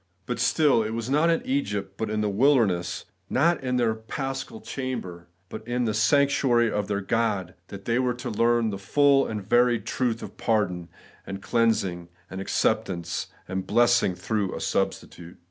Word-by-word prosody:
But 120 +3 -3
still 125 +1 +3
it 110 +1 -3
was 115 +2 -4
not 155 +4 +3
in 165 - +1
Egypt, 105 -8 -2
but 110 +1 -3
in 105 0 -1
the 105 - 0
wilder 125 +5 +4
ness; 90 -3 -3 0.2
not 170 +5 +2
in 125 -1 0
their 115 -2 +2
paschal 135 - -5
chamber, 120 - -5 0.2
but 110 - -7
in 120 0 0
the 110 - 0
sanctuary 125 -1 +3
of 105 -1 -2
their 100 -1 -1
God, 100 -4 -1
that 100 0 -10
they 115 +1 +1
were 125 -2 0
ta 125 - -5
learn 115 0 +2
the 100 - -5
full 140 +6 +3
and 105 -3 -5
varied 120 0 +3
truth 120 -3 -1
of - - -9
pardon, 90 -6 0 0.4
and 95 - -5
cleansing, 100 -8 0 0.2
and 95 - -5
acceptance, 85 -3 -1 0.2
and 95 0 -4
blessing 120 -4 +3
through 105 -1 -2
a - - -5
substitute. 85 0 -3
115 Hz, 175 wpm, -25 LUFS, 100-125 Hz, 0.4 s, wilder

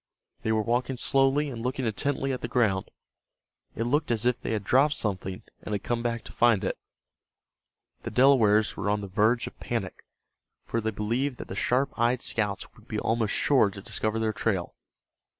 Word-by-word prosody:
They 110 - -1
were 110 -1 +2
walking 125 +3 -1
slowly 135 +3 +2
and 115 -2 -6
looking 125 +2 -2
intently 135 +4 -1
at 125 - -4
the - - -3
ground. 110 -6 +1 0.9
It 115 - -1
looked 145 +6 0
as 115 -1 +1
if 125 0 +2
they - - -2
had 105 -2 -2
dropped 140 +8 +3
something, 95 -3 -2 0.2
and 105 - -5
had 100 - -4
come 120 -1 -1
back 115 -1 -2
to - - -11
find 120 -5 +3
it. - - -2 1.2
The - - -5
Delawares 115 -5 +4
were 100 - -2
on 105 0 +1
the 100 - -5
verge 110 +5 +2
of - - -10
panic, - - -4 0.6
for 115 - -2
they 110 - -1
believed 120 +6 -2
that - - -9
the - - -5
sharp 135 +3 +1
eyed 120 +2 +2
scouts 105 -3 -1
would - - -21
be - - -3
almost 115 -2 0
sure 130 -8 +3
to 100 0 -10
discover 110 +2 -2
their 110 -1 0
trail. 100 -5 -1
115 Hz, 190 wpm, -27 LUFS, 105-125 Hz, 1.2 s, Delawares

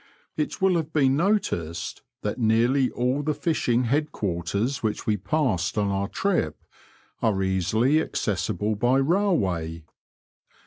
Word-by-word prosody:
It 155 +5 -2
will 190 -2 +3
have 160 -1 -3
been 135 -4 +3
noticed 90 - -1 0.2
that 105 +4 -2
nearly 120 +4 +3
all 125 +4 0
the 150 0 -1
fishing 125 -7 +1
head 145 +5 0
quarters 100 - -2
which 110 -2 -2
we 110 - +2
passed 100 - 0
on 100 -1 +1
our 100 0 -1
trip 165 - -1 0.6
are 100 -4 +1
easily 110 - +2
accessible 105 - -1
by 120 +5 +2
railway. 100 - 0
120 Hz, 130 wpm, -25 LUFS, 95-150 Hz, 0.6 s, will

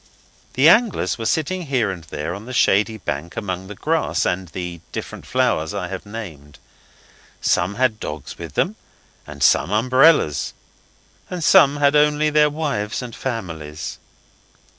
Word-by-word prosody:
The 135 +4 +4
anglers 215 - +3
were 115 - -2
sitting 170 +2 -1
here 125 -7 +1
and 90 -3 -8
there 75 +2 -4
on 100 +4 -8
the 130 - -7
shady 110 -1 +2
bank 85 -4 -5
among 95 -3 -4
the 105 - -8
grass 160 +8 0
and 90 +1 -1
the 85 0 -6
different - - -7
flowers 80 +5 0
I 90 -3 -3
have 95 +2 -7
named. 80 -10 -9 0.8
Some 90 +4 +1
had 120 -3 +1
dogs 75 -2 -7
with - - -8
them, - - 0 0.5
and - - -5
some - - +4
umbrellas, 130 - +3 0.8
and 180 -2 -4
some 145 -1 +6
had 145 0 +3
only 150 +1 +3
their 150 0 +4
wives 140 -8 -2
and 120 -2 -8
families. 80 - -5
110 Hz, 150 wpm, -21 LUFS, 90-145 Hz, 0.8 s, some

